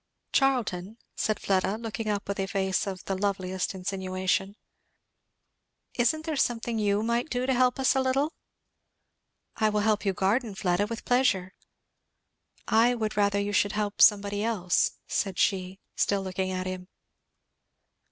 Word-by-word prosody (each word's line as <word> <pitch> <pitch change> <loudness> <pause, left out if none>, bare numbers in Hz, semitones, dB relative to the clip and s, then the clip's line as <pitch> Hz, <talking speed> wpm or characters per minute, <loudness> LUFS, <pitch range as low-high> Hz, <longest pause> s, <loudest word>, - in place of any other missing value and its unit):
"Charlton," 225 -7 +1 0.2
said 215 - -1
Fleda 195 +1 0
looking 225 -1 -4
up 205 -1 -2
with 200 0 -3
a 195 - -1
face 190 -1 0
of 190 -1 -5
the 195 - -1
loveliest 190 -1 -2
insinuation. 190 +1 -2 1.4
"isn't 285 +6 +1
there 320 -2 -2
something 235 -3 0
you 205 0 +1
might 235 +5 0
do 250 0 -1
to 265 - +1
help 255 +1 +2
us 265 +1 +3
a 265 - +3
little?" 270 +4 +1 1.2
"I 215 - +3
will 210 0 0
help 215 0 +1
you 195 -2 +1
garden, 205 +3 0
Fleda, 190 +1 0
with 230 +1 -6
pleasure." 235 -8 +2 1.1
"I 235 +3 +4
would 220 -2 -2
rather 200 0 +2
you 205 0 -2
should 205 0 +2
help 210 -1 -2
somebody 205 0 +5
else," 195 -6 +1
said 195 -3 -2
she, 190 -1 0 0.2
still 200 -1 +1
looking 185 0 -2
at 185 0 -3
him. 185 -1 -5
205 Hz, 150 wpm, -27 LUFS, 190-230 Hz, 1.4 s, somebody